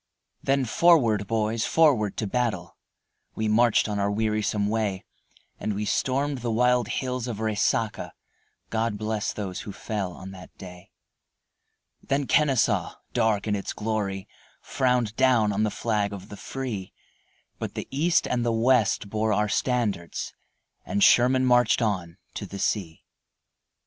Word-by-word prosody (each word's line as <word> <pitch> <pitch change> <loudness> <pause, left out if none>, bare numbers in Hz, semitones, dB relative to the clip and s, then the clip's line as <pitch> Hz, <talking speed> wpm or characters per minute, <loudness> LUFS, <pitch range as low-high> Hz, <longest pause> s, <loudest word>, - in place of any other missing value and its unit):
Then 135 -1 +1
forward, 115 - +3
boys, 110 0 0
forward 135 -11 +3
to 110 - -1
battle, 105 -5 -2 0.6
We 110 - -1
marched 115 +2 +3
on 105 -1 -2
our 100 0 +1
wearisome 105 -1 0
way, 105 -3 -1 0.6
And 105 - -2
we 105 +1 -2
stormed 135 +5 0
the 120 0 -3
wild 125 0 +2
hills 125 -2 -3
of 115 -4 -4
Resaca, 110 +1 0 0.6
God 115 -1 -1
bless 110 0 -2
those 95 -4 -5
who 105 - -7
fell 100 -2 -4
on 95 +2 -9
that 90 -1 -13
day 90 0 -11 1.1
Then 140 +1 -1
Kenesaw, 125 - +2 0.2
dark 110 -4 +1
in 105 -1 0
its 100 - -4
glory, 105 -3 -3 0.3
Frowned 125 -4 0
down 115 -5 +3
on 100 - 0
the 110 - +2
flag 105 -2 -1
of 100 -2 -9
the 105 - -8
free, 120 -9 -5 0.7
But - - -5
the - - -5
East 165 +5 +2
and 125 -1 0
the 120 - +1
West 115 -3 +2
bore 110 +1 -1
our 105 0 +1
standards, 110 -7 -1 0.5
And 100 - 0
Sherman 130 +2 +5
marched 120 -2 +4
on 95 -7 -2 0.2
to 100 - -6
the 100 - -8
sea. 95 -5 -2
110 Hz, 145 wpm, -26 LUFS, 100-125 Hz, 1.1 s, Sherman